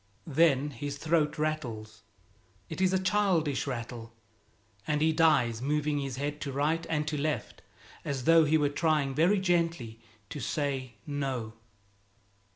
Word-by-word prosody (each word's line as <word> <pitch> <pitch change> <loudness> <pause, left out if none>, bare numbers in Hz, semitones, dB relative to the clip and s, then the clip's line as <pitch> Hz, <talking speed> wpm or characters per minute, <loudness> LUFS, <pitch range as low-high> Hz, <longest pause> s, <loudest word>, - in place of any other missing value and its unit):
Then 150 -2 +2
his 140 +3 -5
throat 155 -1 +1
rattles. 120 -9 -3 0.7
It - - -5
is 185 -1 +3
a 190 - +3
childish 185 -8 +1
rattle, 115 -2 -6 0.7
and 150 -1 +1
he 160 +1 +3
dies 150 -8 +3
moving 150 +1 0
his 135 -3 -4
head 145 +2 -4
to 140 - -3
right 150 +5 0
and 150 -2 -1
to 150 -1 -2
left 155 0 -3 0.4
as 135 -3 -3
though 165 +3 +6
he 155 +1 +3
were 145 -2 +2
trying 150 -2 +1
very 175 +8 +3
gently 165 -11 0 0.3
to 150 - -5
say 135 -5 -3
"No." 135 -6 -3
150 Hz, 145 wpm, -29 LUFS, 135-160 Hz, 0.7 s, though